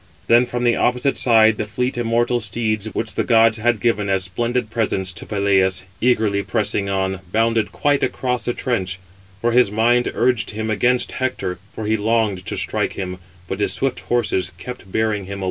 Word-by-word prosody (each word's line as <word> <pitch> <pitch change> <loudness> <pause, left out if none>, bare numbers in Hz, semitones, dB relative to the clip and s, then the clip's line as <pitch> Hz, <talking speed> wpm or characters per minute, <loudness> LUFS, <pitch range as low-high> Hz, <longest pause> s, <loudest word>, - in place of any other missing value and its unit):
Then, 120 +1 +4
from 120 0 -3
the 120 -1 +3
opposite 125 +3 +1
side, 110 -3 +4
the - - -1
fleet 125 +5 -2
immortal 120 +1 +1
steeds, 110 -1 -1
which 110 -1 -2
the - - 0
gods 115 -1 +4
had 120 0 +1
given 105 -4 0
as 95 -1 +1
splendid 120 +5 -2
presents 100 -5 -1
to - - -8
Peleus, 95 -2 +1 0.2
eagerly 110 -5 +2
pressing 100 0 0
on, 95 -1 -1
bounded 115 0 +1
quite 145 -1 +1
across 125 -2 -1
the 120 - 0
trench; 95 -8 -2 0.4
for 120 - +1
his 125 -3 +4
mind 120 +3 +2
urged 120 -5 +1
him 110 +1 -3
against 125 +4 +1
Hector, 130 -8 -3
for 110 - -6
he 110 +1 +1
longed 105 -3 0
to - - -2
strike - - -1
him, 90 -1 -5 0.3
but 95 - -4
his 105 - +2
swift 135 -1 -1
horses 110 -7 -1
kept 95 -1 -9
bearing 110 -2 0
him 100 +1 -6
away. - - -8
110 Hz, 185 wpm, -20 LUFS, 100-120 Hz, 0.4 s, Then